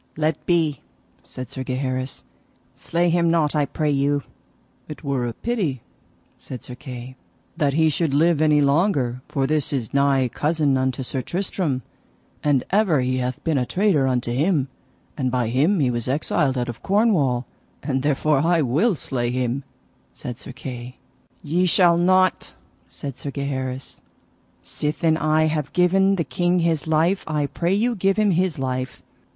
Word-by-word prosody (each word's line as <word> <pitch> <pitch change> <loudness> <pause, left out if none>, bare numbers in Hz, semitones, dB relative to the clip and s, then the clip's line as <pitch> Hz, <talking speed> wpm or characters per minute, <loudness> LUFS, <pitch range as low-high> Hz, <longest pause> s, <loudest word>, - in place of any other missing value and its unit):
Let 155 0 0
be, 165 -4 +1 0.4
said 130 -1 -8
Sir 130 - -5
Gaheris, 130 0 -3 0.5
slay 170 +1 0
him 170 0 +2
not 160 -3 +2
I 145 -2 +2
pray 150 -1 -1
you. 140 0 +1 0.6
It 150 - -9
were 130 -4 -1
pity, 170 - -2 0.5
said 125 - -9
Sir 125 - -8
Kay, 130 -1 -9 0.4
that 145 -2 +1
he 160 0 +4
should 155 0 0
live 155 +2 +3
any 150 -1 +4
longer, 140 - +1
for 135 -1 -1
this 150 0 0
is 125 -6 -3
nigh 140 -2 +3
cousin 150 +2 +1
unto 130 0 0
Sir 130 +1 -3
Tristram, 170 -6 -2 0.6
and 145 -4 +2
ever 190 -8 +3
he 130 0 0
hath 125 0 -3
been 155 -4 +1
a 125 - 0
traitor 180 -9 +2
unto 125 -2 0
him, 140 +1 +1 0.5
and 130 -3 0
by 125 -2 0
him 150 - +2
he 130 -4 +2
was 120 0 -3
exiled 135 -1 +1
out 125 0 -1
of 120 -2 -7
Cornwall, 175 - +2 0.4
and 135 -2 -1
therefore 145 +1 +2
I 165 +1 +2
will 165 - +2
slay 125 -4 -2
him, 125 +2 -1 0.5
said 125 -1 -7
Sir - - -9
Kay. 125 -1 -8 0.5
Ye 175 +5 +1
shall 170 -1 +4
not, 185 +1 +2 0.3
said 140 -3 -8
Sir 145 - -5
Gaheris; 135 -2 -4 0.6
sithen 155 +2 0
I 155 0 +2
have 155 -2 -1
given 190 +2 +3
the 170 - 0
king 175 +7 0
his 165 -3 0
life, 165 +5 +2
I 150 -2 0
pray 175 +6 -1
you 235 +4 +1
give 195 -1 +1
him 210 -2 +3
his 180 -1 +1
life. 130 -1 -3
145 Hz, 160 wpm, -22 LUFS, 130-170 Hz, 0.6 s, he